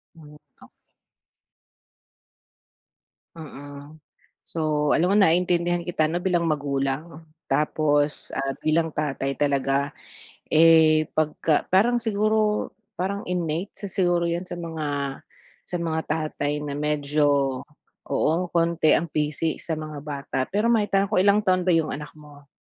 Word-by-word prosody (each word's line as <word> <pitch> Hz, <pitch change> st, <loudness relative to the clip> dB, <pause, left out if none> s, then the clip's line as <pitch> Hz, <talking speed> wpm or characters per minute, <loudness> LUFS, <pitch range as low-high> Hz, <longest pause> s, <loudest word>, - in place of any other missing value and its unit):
Hmm, 150 Hz, -2 st, -14 dB, 0.3 s
okey. -, -, -14 dB, 2.7 s
Mm, 145 Hz, -1 st, -10 dB, 0.5 s
so 150 Hz, -2 st, 0 dB
alam 180 Hz, +3 st, +2 dB
mo 200 Hz, -, +3 dB
naiintindihan 175 Hz, -1 st, +2 dB
kita 165 Hz, -2 st, 0 dB
'no, 170 Hz, +3 st, -2 dB
bilang 175 Hz, -2 st, +1 dB
magulang 140 Hz, -2 st, -1 dB
'no. 155 Hz, -, -12 dB, 0.3 s
Tapos, 145 Hz, +1 st, +1 dB
ah, 135 Hz, 0 st, -2 dB
bilang 160 Hz, 0 st, +1 dB
tatay 140 Hz, -2 st, -2 dB
talaga, 140 Hz, 0 st, 0 dB, 0.6 s
eh, 160 Hz, -1 st, +5 dB
pagka 155 Hz, 0 st, +1 dB
parang 235 Hz, +6 st, +4 dB
siguro 215 Hz, -1 st, +1 dB, 0.2 s
parang 200 Hz, +1 st, -3 dB
innate, 175 Hz, +1 st, -2 dB
isa 200 Hz, -, -7 dB
siguro 175 Hz, -3 st, +1 dB
'yan 170 Hz, +2 st, -2 dB
sa 175 Hz, -, -7 dB
mga 160 Hz, -2 st, -4 dB, 0.8 s
sa 180 Hz, -, -3 dB
mga 160 Hz, -1 st, -1 dB
tatay 150 Hz, -1 st, -2 dB
na 145 Hz, -1 st, -4 dB
medyo, 145 Hz, -2 st, +1 dB, 0.5 s
oo, 155 Hz, -, +1 dB, 0.2 s
konti 170 Hz, -1 st, +2 dB
ang 170 Hz, +2 st, +2 dB
pisi 150 Hz, +1 st, -1 dB
sa 160 Hz, -2 st, -3 dB
mga 155 Hz, -1 st, -6 dB
bata. 140 Hz, -2 st, -4 dB
Pero 210 Hz, +4 st, 0 dB
maitanong 200 Hz, -3 st, +2 dB
ko, -, -, +2 dB
ilang 200 Hz, +2 st, +4 dB
taon 185 Hz, -1 st, +2 dB
ba 180 Hz, -, +3 dB
'yung 160 Hz, -2 st, +2 dB
anak 150 Hz, +1 st, -7 dB
mo? 145 Hz, -1 st, -15 dB
155 Hz, 130 wpm, -24 LUFS, 150-175 Hz, 2.7 s, eh